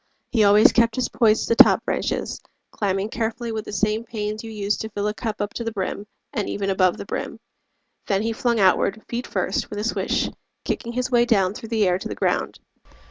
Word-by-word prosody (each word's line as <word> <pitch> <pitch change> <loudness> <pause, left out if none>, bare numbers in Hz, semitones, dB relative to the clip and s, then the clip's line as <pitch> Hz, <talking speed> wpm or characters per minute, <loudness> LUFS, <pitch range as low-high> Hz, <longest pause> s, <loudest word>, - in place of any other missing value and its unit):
He 225 -4 +3
always 205 +1 +7
kept 230 -1 +3
his 255 -2 -1
poise 220 -2 +3
To - - -8
the - - +11
top - - +1
branches, - - -2 0.3
climbing 195 0 -1
carefully 230 +1 -3
With 220 -1 -4
the - - -7
same 215 +3 0
pains 215 -1 -4
you 225 - -7
use 210 -1 -1
to 220 - -5
fill 205 -1 -2
a 210 - -1
cup 215 -1 -4
Up 205 0 -3
to 235 - -4
the 230 - -3
brim, 200 0 -4 0.3
and 210 -7 -2
even 195 -1 -1
above 185 -2 +2
the - - -7
brim. - - -5 0.7
Then 195 0 +1
he 225 0 -1
flung 235 0 0
outward, 195 +2 +2
feet 240 +1 -4
first, 185 0 -2
with 205 - -6
a 210 - -2
swish, 230 - 0 0.4
Kicking 235 - -3
his 250 +1 -2
way 240 -1 +4
down 195 -6 +2
through 225 +1 -9
the 220 -4 +2
air 180 0 +1
to - - -5
the - - -5
ground. - - -1
215 Hz, 225 wpm, -23 LUFS, 200-230 Hz, 0.7 s, the